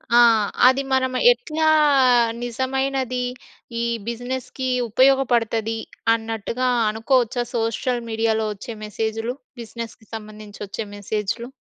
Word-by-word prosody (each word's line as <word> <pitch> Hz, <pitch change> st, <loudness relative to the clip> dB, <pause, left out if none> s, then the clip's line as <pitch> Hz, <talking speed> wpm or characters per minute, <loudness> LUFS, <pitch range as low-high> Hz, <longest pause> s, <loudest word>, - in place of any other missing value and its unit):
ఆ! -, -, +8 dB, 0.5 s
అది 260 Hz, +2 st, +3 dB
మనం 260 Hz, -1 st, +2 dB, 0.2 s
ఎట్లా 320 Hz, -10 st, -1 dB, 0.8 s
నిజమైనది 260 Hz, +1 st, -1 dB, 0.6 s
ఈ -, -, 0 dB, 0.2 s
బిజినెస్‌కి 255 Hz, +2 st, -4 dB, 0.2 s
ఉపయోగపడతది 235 Hz, -3 st, +2 dB, 0.4 s
అన్నట్టుగా, 225 Hz, +2 st, -2 dB, 0.2 s
అనుకోవచ్చా 240 Hz, +2 st, +1 dB
సోషల్ 235 Hz, +2 st, -1 dB
మీడియాలో 220 Hz, -1 st, 0 dB
వచ్చే 215 Hz, +3 st, -8 dB
మెసేజులు? 225 Hz, +3 st, -3 dB, 0.3 s
బిజినెస్‌కి 230 Hz, -1 st, -8 dB
సంబంధించి 215 Hz, -1 st, -10 dB
వచ్చే 215 Hz, +2 st, -5 dB
మెసేజులు. 210 Hz, +3 st, -3 dB
235 Hz, 95 wpm, -22 LUFS, 220-260 Hz, 0.8 s, ఆ